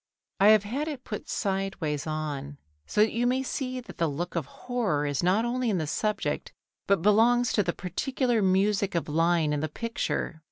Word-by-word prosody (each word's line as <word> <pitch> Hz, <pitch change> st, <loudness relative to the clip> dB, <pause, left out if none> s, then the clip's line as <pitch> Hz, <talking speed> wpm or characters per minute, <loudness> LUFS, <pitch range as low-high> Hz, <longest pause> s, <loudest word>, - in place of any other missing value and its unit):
I 200 Hz, -, +6 dB
have 215 Hz, -1 st, +7 dB
had 265 Hz, +9 st, -3 dB
it 285 Hz, -5 st, -5 dB
put 210 Hz, -, -6 dB
sideways 190 Hz, -7 st, -2 dB
on 145 Hz, -2 st, -4 dB, 0.3 s
so 210 Hz, -, +1 dB
that 220 Hz, -, +4 dB
you 240 Hz, +1 st, +1 dB
may 260 Hz, +2 st, +1 dB
see 255 Hz, -1 st, -3 dB
that 245 Hz, -, -13 dB
the 165 Hz, -, +2 dB
look 175 Hz, +6 st, -4 dB
of 160 Hz, -5 st, -2 dB
horror 215 Hz, -, -1 dB
is 145 Hz, -2 st, -1 dB
not 190 Hz, +6 st, +2 dB
only 245 Hz, 0 st, 0 dB
in 200 Hz, -, +1 dB
the 160 Hz, -, -1 dB
subject 210 Hz, +7 st, -2 dB, 0.4 s
but 200 Hz, -4 st, +2 dB
belongs 235 Hz, +4 st, +4 dB
to 210 Hz, -, +3 dB
the 175 Hz, -3 st, 0 dB
particular 240 Hz, -, -1 dB
music 195 Hz, +1 st, +2 dB
of 170 Hz, -, -1 dB
line 165 Hz, 0 st, +2 dB
in 150 Hz, -, 0 dB
the 155 Hz, +1 st, -2 dB
picture. 225 Hz, -4 st, -3 dB
195 Hz, 195 wpm, -27 LUFS, 160-235 Hz, 0.4 s, have